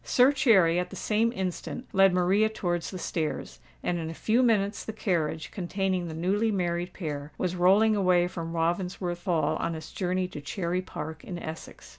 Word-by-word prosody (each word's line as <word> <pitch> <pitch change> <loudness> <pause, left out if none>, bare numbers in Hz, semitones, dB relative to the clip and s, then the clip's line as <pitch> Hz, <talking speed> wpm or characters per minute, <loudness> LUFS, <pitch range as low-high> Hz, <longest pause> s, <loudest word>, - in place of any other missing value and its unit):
Sir 255 +2 +5
Cherry 195 -12 +4
at 180 0 -2
the - - -9
same 225 +2 +1
instant 190 +3 -4
led 195 0 +6
Maria 185 +4 +3
towards 175 -5 -2
the 185 - -6
stairs; 160 -3 -3 0.2
and 175 -1 0
in 160 -1 -4
a 165 - -6
few 225 +8 +2
minutes 215 -4 +2
the 220 - -5
carriage, 165 -7 -1
containing 190 -1 -1
the 160 - -6
newly 200 +7 +1
married 175 -2 -1
pair, 150 -4 -5
was 185 -1 -1
rolling 200 +5 +5
away 180 -3 +3
from 165 -2 -5
Ravensworth 175 +1 -1
Hall 170 -4 +1
on 165 - -2
its 160 0 -8
journey 185 0 -1
to 150 -5 -7
Cherry 170 +4 -2
Park 160 -3 -7
in 180 - -6
Essex. 160 -1 -8
180 Hz, 185 wpm, -28 LUFS, 170-200 Hz, 0.2 s, led